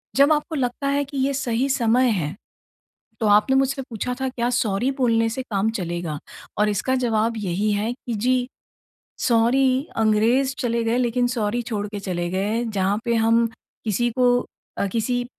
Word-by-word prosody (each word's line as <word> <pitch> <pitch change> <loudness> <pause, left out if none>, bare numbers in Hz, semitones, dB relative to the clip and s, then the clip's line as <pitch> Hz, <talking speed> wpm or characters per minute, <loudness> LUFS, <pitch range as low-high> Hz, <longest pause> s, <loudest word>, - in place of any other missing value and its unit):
जब 280 +3 +5
आपको 305 +2 -2
लगता 265 0 -2
है 280 +1 +1
कि 280 +1 -8
ये 270 +1 +1
सही 250 -1 0
समय 250 -1 +3
है, 170 -7 -1 0.8
तो 220 - +1
आपने 210 +6 +4
मुझसे 270 +1 +1
पूछा 250 -1 -4
था 265 - 0
क्या 245 -1 -1
सॉरी 240 +1 0
बोलने 230 -2 +3
से 255 +4 -3
काम 210 -3 0
चलेगा? 175 -6 -4 0.4
और 210 0 +3
इसका 210 +6 0
जवाब 230 -2 0
यही 205 +1 -1
है 210 +3 -1
कि 245 -1 -7
जी 250 +3 +1 0.8
सॉरी 255 +4 +3
अंग्रेज़ 225 +5 +2
चले 235 -3 0
गए 230 +2 +1
लेकिन 245 0 +1
सॉरी 235 -1 -1
छोड़ 210 -3 -3
के 205 0 -6
चले 175 -3 -3
गए। 205 +6 -1
जहाँ 205 -2 0
पे 235 -1 +1
हम 230 +1 +3 0.4
किसी 240 +3 0
को 245 -1 +4 0.4
अ, 200 - +1
किसी 245 +2 0
235 Hz, 170 wpm, -23 LUFS, 210-255 Hz, 0.8 s, जब